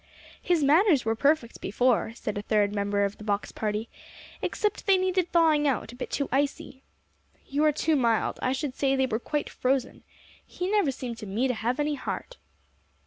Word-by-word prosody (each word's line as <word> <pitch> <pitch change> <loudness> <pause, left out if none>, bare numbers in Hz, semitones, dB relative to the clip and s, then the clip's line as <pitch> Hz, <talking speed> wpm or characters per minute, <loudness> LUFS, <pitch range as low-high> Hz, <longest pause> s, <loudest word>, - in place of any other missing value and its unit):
"His 345 -4 +1
manners 305 - +4
were 225 - +2
perfect 280 0 +1
before," 230 +2 +1
said 210 -3 -4
a 205 - -2
third 205 -1 +1
member 200 0 +1
of 200 - -5
the - - -9
box 205 -1 -2
party, 215 +1 -3 0.5
"except 420 0 -2
they 390 -1 +6
needed 370 -1 0
thawing 315 -3 +4
out 245 -4 -1
a - - -12
bit 250 - -6
too 280 - -1
icy." 275 0 -1 0.6
"You 285 +2 -1
are 305 - +5
too 310 +2 +1
mild. 235 -5 +1
I 255 - +1
should 270 0 -2
say 270 -1 +1
they 265 0 +2
were 225 -3 -2
quite 295 +4 -2
frozen. 260 0 -1 0.4
He 360 +2 -4
never 415 -8 +3
seemed 245 -3 -6
to 215 - -7
me 220 +7 0
to 255 - 0
have 240 +4 -2
any 295 0 +1
heart." - - -5
265 Hz, 195 wpm, -27 LUFS, 225-300 Hz, 0.6 s, they